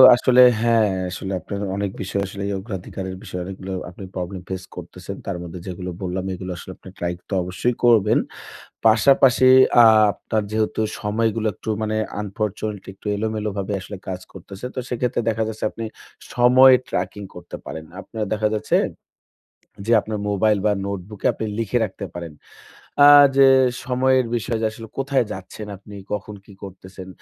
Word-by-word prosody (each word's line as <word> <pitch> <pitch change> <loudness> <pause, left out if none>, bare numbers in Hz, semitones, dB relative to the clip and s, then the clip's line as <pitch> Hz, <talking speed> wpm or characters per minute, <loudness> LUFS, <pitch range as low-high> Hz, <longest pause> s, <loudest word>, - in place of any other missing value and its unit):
আসলে 125 +1 +4 0.2
হ্যাঁ, 115 -3 +3 0.2
আসলে 95 +1 -5
আপনার 100 +4 -6 0.2
অনেক 100 -1 -2
বিষয় 100 +1 -2
আসলে 100 +1 -7
এই 100 - -2
অগ্রাধিকারের 95 -2 -6
বিষয়ে 90 0 -5
অনেকগুলো 95 0 -7 0.2
আপনি 90 +2 -11
প্রবলেম 90 +1 -5
ফেস 95 -1 -4
করতেছেন। 90 +2 -8
তার 95 -3 -3
মধ্যে 85 +1 -8
যেগুলো 90 0 -5
বললাম 95 0 -3
এগুলো 90 0 -6
আসলে 95 - -9
আপনি - - -13
ট্রাই 85 0 -1 0.2
তো - - -4
অবশ্যই 105 +7 -1
করবেন। 110 -2 +5 0.7
পাশাপাশি 130 +3 +5 0.3
আ - - +8 0.3
আপনার 110 -1 -2
যেহেতু 110 0 -1 0.2
সময়গুলো 110 +1 0
একটু - - -11
মানে 110 0 -1 0.2
আনফরচুনেটলি 105 0 -4
একটু 95 - -16
এলোমেলো 110 0 -2
ভাবে 100 +1 -3
আসলে 100 +1 -8
কাজ 90 -1 -4
করতেছে। 95 +3 -11
তো - - -6
সেক্ষেত্রে 125 -1 -1
দেখা 110 0 -1
যাচ্ছে 110 0 -5
আপনি 115 - -7 0.5
সময় 130 +2 +7
ট্র্যাকিং 95 +3 -3
করতে 90 0 -9
পারেন। 80 0 -7 0.2
আপনার 110 +1 -5
দেখা 105 0 +1
যাচ্ছে 105 - 0 1.1
যে 115 - 0
আপনার 110 -1 -4
মোবাইল 105 +1 +2
বা 105 - +4
নোটবুকে 100 +1 -6
আপনি - - -4
লিখে 115 +2 0
রাখতে 100 0 -7
পারেন। 85 -3 -7 0.7
আ - - +9 0.3
যে 135 -1 +7 0.4
সময়ের 130 0 +2
বিষয় 115 0 -2
যে - - +2
আসলে 115 +1 -10
কোথায় 135 -2 +1
যাচ্ছেন 95 +3 -8
আপনি 100 +2 -14 0.2
কখন 105 0 -4
কী 100 - -15
করতেছেন 95 -1 -10
105 Hz, 160 wpm, -22 LUFS, 95-110 Hz, 1.1 s, আ